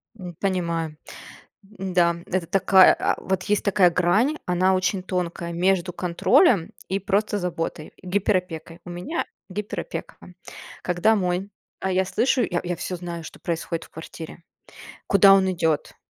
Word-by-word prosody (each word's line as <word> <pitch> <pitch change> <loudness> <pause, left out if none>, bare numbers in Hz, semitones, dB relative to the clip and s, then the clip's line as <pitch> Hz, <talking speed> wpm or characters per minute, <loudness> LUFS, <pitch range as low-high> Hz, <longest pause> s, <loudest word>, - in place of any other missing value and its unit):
М, 180 -5 -9
понимаю. 170 -5 -2 0.7
Да, 185 -4 0
это 180 -2 -2
такая, 190 +1 +6
а - - +1
вот 190 -1 -2
есть 210 -1 0
такая 195 -3 +4
грань, 195 - +2
она 185 +1 +2
очень 185 +1 0
тонкая, 175 -2 -3
между 180 +1 +1
контролем 180 - +3 0.2
и 195 +1 0
просто 205 +2 0
заботой, 165 -4 -4
гиперопекой. 180 -3 -2
У 175 - -9
меня 175 - -3 0.2
гиперопека. 210 - -5 0.7
Когда 180 +5 +2
мой, 185 0 -1 0.3
а, 190 - -1
я 190 0 +2
слышу, 250 +6 +1
я 175 -1 -1
я 175 -1 -3
всё 180 - -4
знаю, 170 -2 -6
что - - -10
происходит 165 0 -3
в - - -18
квартире, 160 +1 -10 0.7
куда 195 0 +7
он 190 -1 +4
идет. 160 -4 -1
180 Hz, 140 wpm, -24 LUFS, 170-195 Hz, 0.7 s, куда